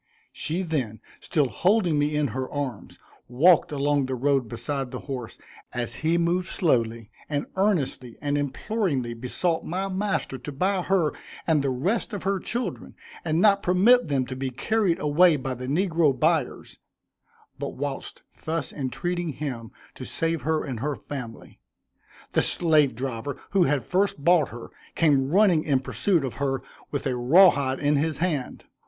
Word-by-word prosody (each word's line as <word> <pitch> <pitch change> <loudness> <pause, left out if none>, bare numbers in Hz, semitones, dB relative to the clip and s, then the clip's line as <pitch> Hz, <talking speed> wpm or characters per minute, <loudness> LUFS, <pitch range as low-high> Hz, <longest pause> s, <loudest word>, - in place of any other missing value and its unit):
She 175 +5 -2
then, 130 - -2 0.2
still 150 -5 +1
holding 175 - +2
me 150 +1 +1
in 150 -2 +1
her 130 +3 -4
arms, 135 -7 -5 0.3
walked 155 +9 +4
along 145 -1 +1
the 130 - -2
road 135 -1 +1
beside 125 +4 -3
the 125 0 -6
horse 130 -5 -6 0.4
as 120 -1 -3
he 165 +2 +2
moved 175 +2 +1
slowly, 115 - 0 0.2
and 145 -1 -1
earnestly 165 - 0
and 145 0 -1
imploringly 145 - -1
besought 130 +8 -1
my 190 +3 -2
master 190 -8 -2
to 145 - -7
buy 185 +7 0
her 175 -5 +1 0.3
and 160 -3 +3
the 140 - 0
rest 180 - -1
of 205 - -4
her 195 0 0
children, 240 +6 -4 0.3
and 160 -1 0
not 200 0 +5
permit 200 +7 +4
them 135 -3 0
to 130 - -6
be 130 0 -3
carried 195 - 0
away 155 +3 +4
by 135 -2 -3
the 125 +1 -6
negro 160 -2 +2
buyers; 160 -4 0 0.8
but - - -4
whilst - - -5 0.2
thus 160 -3 -2
entreating 170 +4 -3
him 125 -6 -5 0.2
to - - -9
save 165 -2 -1
her 155 +4 0
and 130 -6 -5
her 145 +4 -2
family, 125 -6 -8 0.7
the - - +4
slave 155 -7 +3
driver, 130 +2 -4
who 195 -3 +4
had 135 -3 0
first 185 -5 0
bought 170 -4 +4
her, 120 0 -10 0.2
came 140 -5 +3
running 180 -3 +4
in 140 -4 +2
pursuit 165 +4 0
of 130 - -4
her 135 -2 -1 0.3
with 145 0 -3
a 130 -2 0
raw 165 +10 +7
hide 135 -2 -2
in 145 0 +2
his 155 0 0
hand. 155 -6 -2
145 Hz, 165 wpm, -25 LUFS, 130-175 Hz, 0.8 s, raw